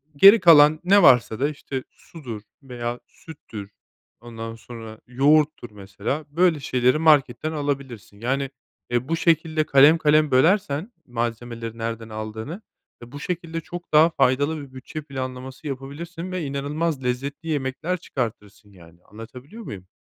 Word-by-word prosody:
geri 200 +9 +8
kalan 155 -3 +7
ne 200 +3 +5
varsa 120 -3 +5
da, 145 +3 +1
işte, 140 -3 -6
sudur 125 -10 -10 0.2
veya 120 -2 -5
süttür, 105 -10 -11 0.5
ondan 115 -1 -8
sonra 115 -1 -10
yoğurttur, 140 -1 +2
mesela, 100 +9 -5
böyle 165 0 +2
şeyleri 125 +1 +1
marketten 150 -3 +3
alabilirsin. 140 -9 -4
Yani, 135 +4 -1 0.4
eee, 120 +1 -1
bu 165 - 0
şekilde 160 -1 +1
kalem 145 +3 +6
kalem 150 -1 +3
bölersen 160 - +2
malzemeleri 115 -1 -4
nereden 115 0 -5
aldığını 110 - -6 0.4
ve 120 - -13
bu 145 - -8
şekilde 165 0 -4
çok 175 +2 -9
daha 155 +2 +6
faydalı 145 +2 +1
bir 135 -2 -12
bütçe 150 +4 -7
planlaması 130 +1 -7
yapabilirsin 160 +6 -6
ve 185 -2 -3
inanılmaz 140 +2 -2
lezzetli 140 +6 -3
yemekler 150 +5 -2
çıkartırsın, 110 - -6
yani, 85 -2 -18
anlatabiliyor 125 - -11
muyum? 95 - -9
135 Hz, 135 wpm, -23 LUFS, 120-155 Hz, 0.5 s, geri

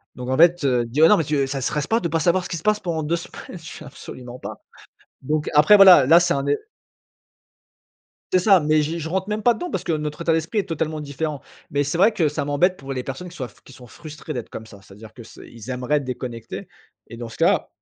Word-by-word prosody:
Donc 125 +1 -7
en 130 - 0
fait, 170 0 +5
heu, 125 -2 +2
dire: 150 +8 +4
«Non 210 - +6
mais 165 - +1
tu, 140 -1 0
ça 135 0 -4
te - - -5
stresse 150 +2 -1
pas 225 +1 +1
de 170 - -2
pas 165 +1 -1
savoir 180 +3 +2
ce - - -8
qui 170 - -3
se 155 - -10
passe 215 0 +2
pendant 160 -3 -3
2 165 +3 0
semaines?» 175 +1 -10
je 165 - -9
fais: 155 - -10
«Absolument 125 -2 -10
pas». - - -9 0.6
Donc 150 +3 -1
après 150 +8 +7
voilà, 185 -8 +8
là 165 +6 +6
c'est 170 -2 +1
un 140 0 -2
é 145 - +2 1.8
C'est - - +6
ça, 190 -1 +5
mais 155 +1 +2
je 155 +3 -2
je 160 -1 -5
rentre 190 +2 -2
même 210 0 -2
pas 240 - +5
dedans 350 +10 -6
parce - - -4
que 170 - -1
notre 150 0 -3
état 165 -1 +1
d'esprit 165 +6 0
est - - -2
totalement 155 -1 -3
différent 145 0 -4 0.3
mais 145 0 0
c'est 150 +4 -3
vrai 210 +4 +5
que 165 -7 +2
ça 145 -1 -3
m'embête 180 +6 +1
pour 135 0 -6
les 125 -1 -4
personnes 180 +7 -7
qui 175 - -13
soient 130 -5 -5
f - - -23
qui 135 - -16
sont 125 - -14
frustrées 155 +4 -9
d'être 120 -4 -6
comme 110 - -8
ça. 105 -3 -15
C'est 100 -1 -16
à - - -17
dire 110 0 -13
que 120 - -12
c'est 115 - -14
ils 115 +1 -12
aimeraient 130 +4 -1
déconnecter 125 -3 -7 0.4
et 115 - -10
dans 120 - -6
ce 110 - -12
cas, - - +2
150 Hz, 270 wpm, -22 LUFS, 130-170 Hz, 1.8 s, voilà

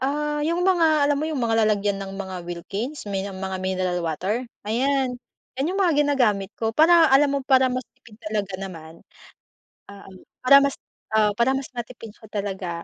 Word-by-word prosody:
Ah, 295 +2 -1
yung 340 +2 0
mga 360 -3 +3 0.2
alam 290 - +2
mo 305 - -2
yung 280 -6 -2
mga 225 -1 +1
lalagyan 205 -1 0
ng 195 -1 -6
mga 190 -1 -6
Wilkins, 205 - -5
may 195 -1 -2
mga 190 -1 -5
mineral 185 -1 -1
water. 185 +9 -2 0.2
Ayan, 260 +3 0 0.4
'yan 270 +4 -1
yung 390 - -3
mga 345 -4 +3
ginagamit 230 -9 +1
ko 225 -1 0
para 325 +1 +6
alam 275 +2 +5
mo - - +1
para 265 -1 +5
mas 255 -1 -3
tipid 215 -2 -19
talaga 210 -3 -3
naman, 170 -4 -9 0.9
ah, 200 0 -12
um, 190 - -13 0.3
para 275 +2 +8
mas, 280 - 0 0.4
ah, 215 -1 +3
para 235 +4 +2
mas 270 - -5
matipid 230 -2 -7
siya 220 - -16
talaga, 195 -3 -3
225 Hz, 180 wpm, -23 LUFS, 195-275 Hz, 0.9 s, para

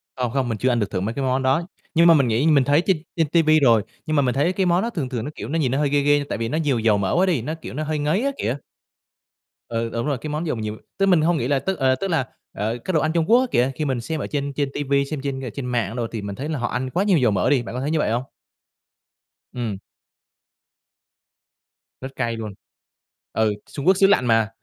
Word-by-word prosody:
Không, 125 -2 -2
không 130 -2 0
mình 110 - -2
chưa 130 +4 +1
ăn 120 -1 +1
được 105 - -1
thử - - -1
mấy 110 +5 -2
cái 140 - -3
món 130 +1 0
đó, 135 +6 +2 0.3
nhưng 170 +1 +5
mà 165 - +8
mình 140 -5 +3
nghĩ 120 +8 +1
mình 145 -4 +5
thấy 145 +5 +3
trên 190 -4 +3 0.2
trên 165 -3 +1
ti 165 +3 +3
vi 155 0 +4
rồi, 115 -6 +4 0.2
nhưng 155 - -1
mà 145 - +4
mình 125 -1 0
thấy 170 +7 +2
cái 190 -1 0
món 175 +1 +3
đó 235 - -1
thường 150 - -3
thường 120 -4 -3
nó, 150 - -5
kiểu, - - -6
nó 165 +2 0
nhìn 130 -5 +1
nó 135 - 0
hơi 145 -1 +1
ghê 145 0 +2
ghê 145 +1 +4
nhưng 145 - -5
tại - - -3
vì 115 0 -2
nó 155 - -1
nhiều 145 -7 +1
dầu 110 -2 +3
mỡ 95 +6 0
quá 185 +2 +4
đi, 165 -10 +1
nó, 155 +6 -4
kiểu, - - -8
nó 155 +3 -3
hơi 155 0 -2
ngấy 155 +9 +1
á 280 - +1
kìa. 125 +5 -1 1.1
Ừ, 115 0 -2
đúng 115 +2 -2
rồi, 140 -3 0
cái 150 - -7
món 155 +3 -3
dầu 140 - -1
nhiều 110 0 -4 0.2
tức 195 - +3
mình 180 -5 +4
hông 165 +1 +2
nghĩ 120 - -1
là 140 -1 +2
tức, 190 +4 -3
ờ, 130 -1 +3
tức 195 - -3
là, 160 -8 0 0.3
ờ, 110 +4 -2
cái, 185 - -1
đồ 155 - +4
ăn 155 +1 0
Trung 165 -2 +1
Quốc 245 - +7
á - - +1
kìa, 125 +3 +2
khi 155 - -2
mình 130 -4 -1
xem 160 +4 -4
ở - - -3
trên 140 -1 -3
trên 140 0 -1
ti 145 - -2
vi, 140 0 +1
xem 145 -1 -5
trên, 135 -1 -3
ờ, 125 - -4
trên 135 +2 -6
mạng 120 -3 -1
đồ 120 -2 -2
thì 110 -2 -6
mình 100 0 -5
thấy 145 +4 -5
là 150 -5 -2
họ 120 - -1
ăn 130 +2 -3
quá 180 +8 0
nhiều 200 -4 +3
dầu 120 -7 +3
mỡ 95 -3 +1
đi, 135 -4 +3
bạn 115 - -7
có 130 - -3
thấy 145 +3 -1
như 160 - +1
vậy 110 - +1
hông? 120 +2 0 1.3
Ừm. 115 -6 -3 2.2
Rất 135 +1 -7
cay 115 -2 -2
luôn. 110 -2 -6 0.8
Ừ, 110 -1 +2 0.2
Trung 140 +3 -5
Quốc 190 - +5
xứ 195 0 +5
lạnh 195 -10 +3
mà, 115 -2 +3
135 Hz, 290 wpm, -22 LUFS, 120-155 Hz, 2.2 s, mà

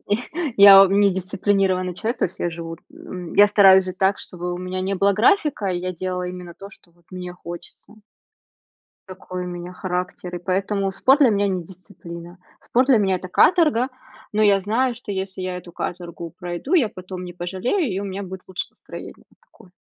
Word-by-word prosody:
я 255 +8 -2
я 200 -1 +10
ом 195 +1 +2
не 200 -1 +5
дисциплинированный 185 0 0
человек, 225 +7 -3
то - - +2
есть - - -14
я 175 - -1
живу, 165 0 -7 0.2
м, 180 -2 -9
я 205 0 +7
стараюсь 190 -2 +6
жить 185 0 -7
так, 195 +1 +2
чтобы 180 0 -6
у 175 - -5
меня 185 0 -4
не 195 +1 -1
было 200 +1 +3
графика, 255 - +2
и 180 -2 -1
я 185 +1 -3
делаю 180 0 -4
именно 180 -2 -9
то, 195 - -11
что, 175 - -20
вот, 170 0 -31
мне 180 -1 -7
хочется. 175 +4 -11 1.1
Такой 185 -1 -7
у - - -5
меня 175 0 -7
характер, 180 -1 -4
и - - -5
поэтому 195 +2 -1
спорт 265 +9 +3
для 275 -5 +6
меня 205 -1 +1
не 185 -2 -2
дисциплина, 175 -1 -12 0.2
спорт 250 +2 +1
для 255 -4 +6
меня 190 -2 +2
это 185 - -8
каторга, 290 - +3 0.4
но 215 - +1
я 200 -2 +5
знаю, 235 +5 0
что 225 -4 -8
если 190 -1 -4
я 185 -1 -3
эту 175 -1 -11
каторгу 170 -2 -6
пройду, 175 - -5
я 260 - +4
потом 185 0 -8
не 175 - -7
пожалею, 190 - -2
и 190 - -2
у - - -4
меня 200 0 -5
будет 190 0 -8
лучше 185 -1 -3
настроение, - - -11 0.2
такое. 190 - -21
185 Hz, 200 wpm, -22 LUFS, 180-205 Hz, 1.1 s, я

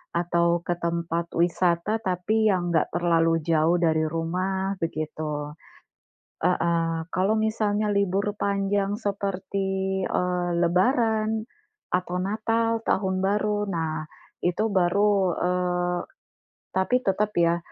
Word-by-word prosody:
atau 170 0 +2
ke 175 - 0
tempat 170 0 -2
wisata, 175 +4 +1
tapi 215 +3 +1
yang 175 -3 0
enggak 160 - +2
terlalu 165 -1 +2
jauh 165 +1 +3
dari 160 -2 +2
rumah, 185 +4 -1
begitu. 155 -2 -3 0.9
Heeh. 165 -2 +1
Kalau, 195 +4 +2
misalnya 215 -1 0
libur 200 +1 0
panjang 200 0 0
seperti, 195 -1 -2
eee, 180 -1 0
lebaran 220 +4 +2 0.5
atau 180 0 0
natal, 225 +3 0
tahun 190 -1 +1
baru, 210 +1 +1
nah, 160 -2 -2 0.4
itu 175 +4 +1
baru, 200 +3 +3 0.3
eee 180 0 0 0.7
tapi 250 +7 +1
tetap 210 +1 0
ya, 170 0 +3
180 Hz, 105 wpm, -25 LUFS, 170-205 Hz, 0.9 s, jauh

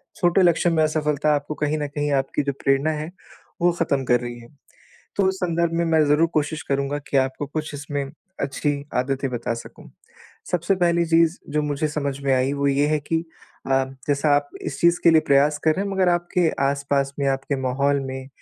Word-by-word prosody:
छोटे 175 -1 +3
लक्ष्यों 175 -1 +3
में 160 -1 +3
असफलता 150 -1 +1
आपको 145 +1 -3
कहीं 150 +1 -1
न 145 - -2
कहीं 145 0 -2
आपकी 135 - -3
जो 140 0 -1
प्रेरणा 135 +3 +2
है, 155 +2 -4 0.5
वो 175 0 +4
खत्म 140 -5 +1
कर 125 -1 +3
रही 120 0 -6
है। 115 - -13 0.7
तो 200 - +2
उस 190 - 0
संदर्भ 170 -2 0
में 170 - +1
मैं 160 -1 +3
ज़रूर 150 +3 +4
कोशिश 155 +2 -1
करूँगा 140 +1 -1
कि 140 - +1
आपको 135 +2 0
कुछ 155 +1 -5
इसमें 145 0 -3 0.4
अच्छी 145 +2 -1 0.2
आदतें 135 +2 0
बता 120 -1 -2
सकूँ। 115 - -10 0.6
सबसे 180 +2 +1
पहली 170 -1 +2
चीज़ 165 +1 +3 0.2
जो 150 - +2
मुझे 150 +1 -1
समझ 140 -2 -3
में 135 -1 +2
आई, 130 +2 +1
वो 140 0 0
ये 140 +1 +2
है 155 0 +1
कि 160 +3 -2 0.4
अ, 135 0 +3 0.2
जैसा 145 +1 +1
आप 145 0 -1
इस - - -5
चीज़ 170 +1 +4
के 170 - +7
लिए 160 -1 +5
प्रयास 145 +2 +4
कर 160 - +4
रहे 195 +3 -1
हैं 200 - -3
मगर 190 -2 +2
आपके 175 0 +1 0.2
आस-पास 140 0 0
में, 140 - 0
आपके 135 +1 -1
माहौल 140 +2 +1
में 130 0 -6
145 Hz, 205 wpm, -23 LUFS, 140-165 Hz, 0.7 s, के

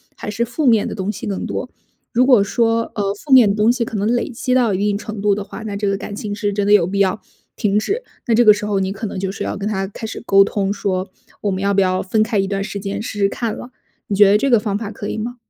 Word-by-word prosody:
还 210 - -6
是 230 +3 -1
负 245 +6 -3
面 225 -5 +4
的 - - -5
东 195 0 -2
西 215 +3 -7
更 200 -2 -3
多。 - - -4 0.4
如 250 +1 +4
果 250 -5 +6
说， 230 +2 +1
呃， 200 -1 -1
负 265 +7 -2
面 245 -6 +8
的 200 - +1
东 215 +1 +3
西 245 0 +2
可 225 -1 -4
能 205 +1 0
累 240 +3 0
积 250 +1 -2
到 240 -5 +3
一 - - 0
定 205 +1 0
程 215 0 -7
度 205 -1 +2
的 205 - -4
话， 210 - -9
那 210 -2 -5
这 200 0 -1
个 195 - 0
感 205 - -7
情 205 0 -5
是 205 0 -2
真 200 0 0
的 205 - +2
有 190 -5 +5
必 200 +1 -2
要 195 +1 +2 0.4
停 210 -2 +1
止。 400 - -1 0.3
那 235 - +2
这 240 +2 +4
个 210 - +9
时 205 0 -5
候 205 -2 0
你 190 0 -1
可 215 +2 -6
能 195 - -5
就 190 0 -2
是 195 - -5
要 - - -3
跟 200 +1 -3
他 195 -2 -2
开 220 +2 -7
始 220 - -7
沟 195 -2 +5
通， 200 -1 -1
说： 190 -2 -2 0.3
“我 205 - +1
们 190 0 -3
要 200 0 +1
不 195 - +3
要 185 0 +1
分 215 +3 +1
开 220 -1 -1
一 195 - +1
段 195 0 -2
时 200 0 -5
间？” 200 +1 -4
试 210 - -6
试 200 -1 +3
看 230 0 -3
了， 245 - -9 0.4
你 200 - -1
觉 205 0 +6
得 210 - +5
这 275 - +1
个 235 - +5
方 205 -1 -2
法 210 -1 -5
可 205 -1 -7
以 - - -4
吗？ 235 +3 -4
205 Hz, 330 characters per minute, -19 LUFS, 195-225 Hz, 0.4 s, 个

